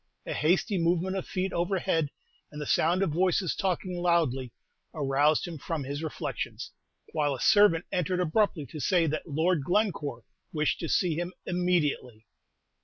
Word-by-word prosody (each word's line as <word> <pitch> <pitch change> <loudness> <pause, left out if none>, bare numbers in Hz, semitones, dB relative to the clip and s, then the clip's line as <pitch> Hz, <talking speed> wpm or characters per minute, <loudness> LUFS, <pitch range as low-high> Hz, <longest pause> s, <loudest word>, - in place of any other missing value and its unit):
A - - -3
hasty 180 +5 +1
movement 175 +3 +1
of 190 - -4
feet 190 +1 -2
overhead, 175 -3 0 0.4
and 150 - -8
the 150 - -4
sound 175 +6 +2
of 190 - 0
voices 180 +2 +1
talking 180 -1 -2
loudly, 150 -8 +1 0.4
aroused 145 +1 +2
him 165 -3 -7
from 160 0 -3
his 140 +3 -4
reflections, 160 -2 -4 0.4
while 145 -3 0
a - - -9
servant 205 - +5
entered 180 -1 0
abruptly 180 -2 +1
to 155 +4 -9
say 175 +2 +2
that 155 +2 -3
Lord 160 +1 +1
Glencore 150 - 0 0.3
wished 155 -1 0
to 165 - -4
see 180 -4 +2
him 175 +3 -3
immediately. 155 -11 -1
165 Hz, 155 wpm, -28 LUFS, 150-180 Hz, 0.4 s, servant